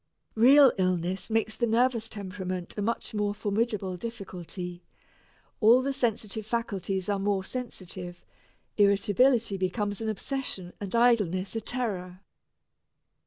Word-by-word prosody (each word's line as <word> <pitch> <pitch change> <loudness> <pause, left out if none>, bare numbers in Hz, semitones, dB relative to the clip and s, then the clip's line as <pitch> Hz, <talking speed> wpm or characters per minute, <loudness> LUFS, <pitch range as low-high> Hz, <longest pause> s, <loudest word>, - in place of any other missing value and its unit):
Real 265 +4 +7
illness 185 +1 0
makes 220 -1 0
the 235 - 0
nervous 230 0 +2
temperament 185 -3 -5
a 210 - -3
much 225 +2 -2
more 205 -1 -1
formidable 205 -3 -1
difficulty 180 -4 -6 0.8
all 235 +3 +6
the 275 +1 -1
sensitive 220 -4 -1
faculties 200 -4 -2
are 200 -1 0
more 195 -1 0
sensitive 185 -7 -6 0.5
irritability 205 +2 +3
becomes 205 +2 -2
an 220 - -1
obsession 215 -5 -4
and 200 +2 -3
idleness 205 -6 +2
a 225 - -1
terror. 195 -7 -3
205 Hz, 120 wpm, -28 LUFS, 185-230 Hz, 0.8 s, Real